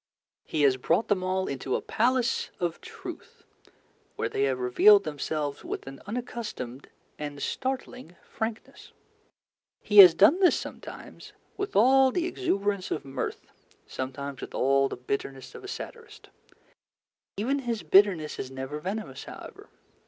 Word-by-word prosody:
He 155 -2 -1
has 135 -2 +4
brought 165 - +1
them 200 -3 +2
all 185 0 0
into 135 -1 -2
a - - 0
Palace 250 +2 +1
of 170 -2 -2
Truth, - - -10 0.7
where - - -2
they 135 - 0
have 135 -2 0
revealed 195 +12 +6
themselves 150 -1 -3
with - - -5
an 135 0 -10
unaccustomed 210 - -6 0.3
and 145 -1 -5
startling 255 - -4
frankness. 220 0 -6 0.9
He 210 -1 +4
has 180 -4 +11
done 215 - +6
this 370 -2 +4
sometimes - - -10 0.2
with 400 0 -4
all 265 +5 +6
the 340 +6 -1
exuberance 205 - -1
of 150 - -3
mirth, 135 -1 -5 0.4
sometimes 135 +1 -6
with - - -8
all 135 +1 +3
the - - -6
bitterness 135 +1 -5
of - - -11
a - - -8
satirist. 460 +3 -9 1.1
Even 260 +8 0
his 235 -5 -3
bitterness 190 -6 +3
is 130 - -4
never 135 +3 -6
venomous, 205 +6 -5
however. - - -11
185 Hz, 140 wpm, -27 LUFS, -, 1.1 s, has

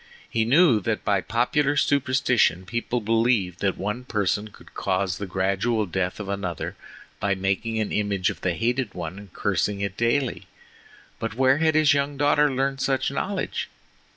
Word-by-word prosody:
He 110 -1 0
knew 135 -1 +5
that 110 +2 -2
by 100 -2 +2
popular 135 +7 +1
superstition 130 -10 +2
people 115 +4 -2
believed 110 -4 +1
that 95 -2 0
one 105 +6 -3
person 105 -3 -1
could 105 - -17
cause 95 -1 -1
the 100 - -4
gradual 100 +4 0
death 90 +1 -2
of 105 - -5
another 100 -4 -4 0.4
by 100 -1 +1
making 95 +4 -1
an 110 - -1
image 100 -3 0
of - - -11
the 90 -2 0
hated 120 0 -1
one 90 +2 -5
and 100 -3 -13
cursing 100 +2 -1
it 100 -2 -3
daily; 120 +2 0 0.7
but - - -4
where 130 +2 +3
had 160 -1 +2
his 155 -2 +5
young 140 0 -1
daughter 145 +1 +3
learned 135 +1 -1
such 135 0 0
knowledge? 190 +7 -3
110 Hz, 165 wpm, -24 LUFS, 95-130 Hz, 0.7 s, knew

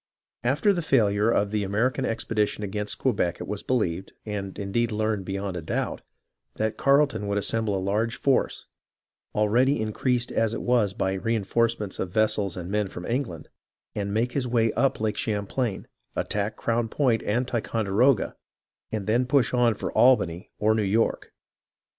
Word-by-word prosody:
After 145 - +3
the 175 - -1
failure 110 -7 +3
of 100 -3 +1
the 105 -1 0
American 110 +6 0
expedition 105 -2 -1
against 105 +1 -3
Quebec 100 -9 0
it - - -6
was 105 0 -4
believed, 95 -7 -1
and 100 -3 -5
indeed 110 +4 -1
learned 110 -2 -1
beyond 95 0 -3
a 90 - -3
doubt, 80 - -2 0.5
that 110 0 -1
Carleton 140 -7 +2
would 100 0 0
assemble 105 0 0
a - - -1
large 105 +5 0
force, 135 0 +1 0.7
already 120 +6 +3
increased 120 +3 0
as 115 0 +1
it - - -4
was 115 -5 +2
by 95 -1 -1
reenforcements 115 0 0
of 95 - -2
vessels 105 -2 +1
and 90 +1 -5
men 105 -1 +1
from 90 -1 -8
England, 115 - -3 0.4
make 105 +4 -1
his 135 -3 -1
way 115 -2 +2
up 135 +3 +1
Lake 110 -1 -1
Champlain, 105 +1 -2 0.3
attack 105 +1 -1
Crown 115 0 -1
Point 120 -4 +1
and 120 +4 0
Ticonderoga, 115 +1 +1 0.6
and 110 -3 -3
then 120 +4 +2
push 130 -4 +2
on 120 -3 +3
for - - -4
Albany 105 -8 +3
or 110 +1 +3
New 110 - +1
York. 105 +3 0
110 Hz, 160 wpm, -26 LUFS, 100-120 Hz, 0.7 s, After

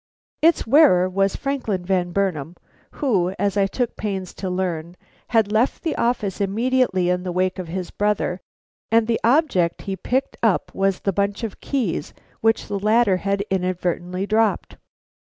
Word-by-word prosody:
Its 330 +2 +4
wearer 225 - +5
was 195 +1 0
Franklin 245 -10 -2
Van 180 -2 0
Burnam, 175 -4 -1 0.4
who, 195 -10 0
as 200 -1 0
I 200 -1 +3
took 240 +4 -2
pains 195 -3 -4
to 190 - -5
learn, 175 -2 -3 0.3
had 220 -3 +2
left 225 +5 +1
the 325 - -1
office 215 -5 -1
immediately 215 -2 +1
in 180 0 0
the 180 0 -4
wake 185 +1 0
of 180 - -5
his 180 +1 -5
brother, 205 -3 -1 0.5
and 225 0 +4
the 230 0 0
object 230 - +2
he 195 - -3
picked 260 +7 -2
up 220 -5 +1
was 195 -1 0
the 195 - 0
bunch 200 +3 -1
of 220 - -5
keys 245 -12 -2 0.2
which 225 0 +1
the 200 - -3
latter 210 -1 +3
had 200 +1 -1
inadvertently 180 0 -1
dropped. 215 +1 0
195 Hz, 160 wpm, -22 LUFS, 185-225 Hz, 0.5 s, wearer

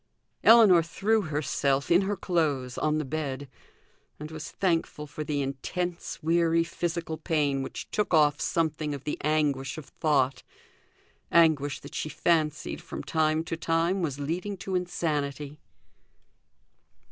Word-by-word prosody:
Ellinor 215 -7 +8
threw 210 +7 +1
herself, 145 -3 -1
in 175 +3 +6
her 200 +1 -1
clothes, 150 -9 0
on 155 0 0
the 155 - -2
bed; 140 -1 -4 0.7
and 150 +1 -7
was 155 0 -7
thankful 165 -5 -1
for 150 +1 -6
the 145 -1 -1
intense 170 +6 -4
weary 165 0 +3
physical 170 -1 -3
pain 150 -4 0
which 135 - -6
took 210 - 0
off 150 -3 +4
something 155 -3 -1
of 140 - -9
the 150 - -3
anguish 145 -3 0
of 155 - -7
thought 135 -2 0 0.9
anguish 155 -4 +3
that 145 - -11
she 155 - -3
fancied 155 -1 0
from - - -7
time 155 0 +1
to 165 - -4
time 165 +3 0
was 145 -5 -2
leading 180 +8 -3
to 190 +1 -6
insanity. 150 -5 -2
155 Hz, 135 wpm, -27 LUFS, 145-170 Hz, 0.9 s, Ellinor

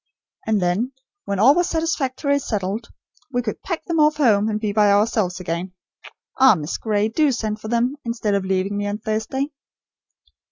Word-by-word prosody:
And 220 -2 +2
then 190 +9 0 0.3
when 200 - -2
all 240 +8 +6
was 350 +2 +1
satisfactorily 285 -4 0
settled, 210 -2 -3 0.4
we 245 -1 0
could 215 - -4
pack 340 -3 -4
them 335 -2 -1
off 300 0 +4
home, 220 -7 +3
and 210 -1 -1
be 210 -2 -2
by 210 -1 +4
ourselves 200 -3 +1
again. 175 +1 -4 0.7
Ah, 265 -4 +7
Miss 155 -1 -4
Gray, 210 -1 +1
do 290 +6 +2
send 215 -3 -3
for - - -7
them, 240 +5 0
instead 230 -3 -1
of 200 -1 +1
leaving 190 +1 -1
me 205 0 -2
on 205 +1 -2
Thursday." 220 +6 -2
220 Hz, 175 wpm, -22 LUFS, 205-265 Hz, 0.7 s, Ah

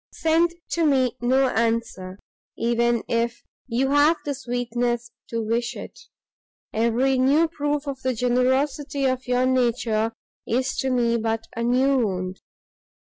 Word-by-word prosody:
Send 335 +1 +2 0.2
to 340 - +1
me 260 -5 +2
no 260 +2 +3
answer, 225 -5 -1 0.4
even 235 0 +1
if 235 +1 -1 0.2
you 260 +3 0
have 295 +3 +4
the 290 - -1
sweetness 240 -2 -2 0.2
to 230 -1 -2
wish 235 +2 -1
it; - - -9 0.7
every 240 +4 +2
new 285 +6 +4
proof 295 -2 -2
of 270 -2 -5
the 260 -1 -1
generosity 260 +4 +1
of 255 -1 -1
your 250 0 +2
nature 235 -3 +1 0.4
is 255 +2 0
to 265 - 0
me 235 -2 +2
but 225 0 -1
a 230 - -3
new 255 +3 +3
wound. 185 -4 -2
250 Hz, 135 wpm, -24 LUFS, 235-270 Hz, 0.7 s, have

